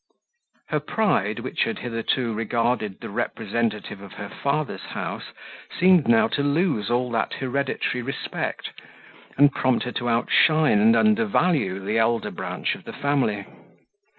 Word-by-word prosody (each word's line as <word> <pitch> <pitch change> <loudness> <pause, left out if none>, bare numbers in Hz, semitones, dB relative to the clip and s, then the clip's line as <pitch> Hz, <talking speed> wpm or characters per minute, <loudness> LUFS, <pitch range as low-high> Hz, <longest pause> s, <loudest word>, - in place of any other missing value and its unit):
Her - - +1
pride, 110 - 0
which 130 - -3
had 115 - -3
hitherto 115 0 -2
regarded 115 -2 -1
the - - -6
representative 105 -1 -2
of 100 - -11
her 100 -1 -7
father's 140 +1 -2
house, - - -5 0.5
seemed 180 -5 +5
now 115 -1 +5
to - - -1
lose 145 - +1
all 120 +1 0
that 115 - -1
hereditary 130 -1 -2
respect, 135 +3 -4 0.7
and 145 -1 +6
prompt 130 -2 +1
her 125 - -4
to 120 0 -2
outshine 135 +2 +3
and 110 +2 +5
undervalue 110 - +2
the 110 +3 +1
elder 115 0 +1
branch - - -3
of - - -10
her - - -6
family. 130 -8 0
120 Hz, 140 wpm, -24 LUFS, 110-140 Hz, 0.7 s, and